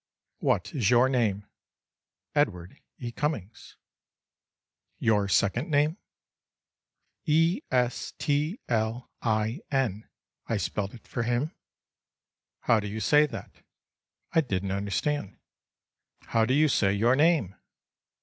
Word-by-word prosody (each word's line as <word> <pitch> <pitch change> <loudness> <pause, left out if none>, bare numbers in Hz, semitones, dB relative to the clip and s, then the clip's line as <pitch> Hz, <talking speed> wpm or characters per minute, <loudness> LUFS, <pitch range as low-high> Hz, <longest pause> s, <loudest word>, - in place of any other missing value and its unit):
"What - - 0
is 115 -9 +1
your 125 +1 +5
name?"—"Edward 105 - -3 0.2
E. 120 -2 -5
Cummings." 120 - -4 1.2
—"Your 105 -3 +2
second 110 - +1
name?"—"E 160 +1 -2
s 125 -1 0
t 150 - 0
l 115 +1 -1
i 110 +4 0
n," 120 -7 -1 0.4
I 115 - 0
spelled 100 +3 -3
it 115 - -16
for 125 - -3
him.—"How 120 -2 -4
do 105 - -4
you 105 +2 -4
say 150 +8 +4
that?"—I 165 - -6
didn't 100 -8 -2
understand.—"How 100 +1 -4
do 130 +3 +1
you 155 +1 +5
say 100 -8 +2
your 115 +5 +3
name?" 150 - +3
120 Hz, 100 wpm, -27 LUFS, 105-145 Hz, 1.2 s, your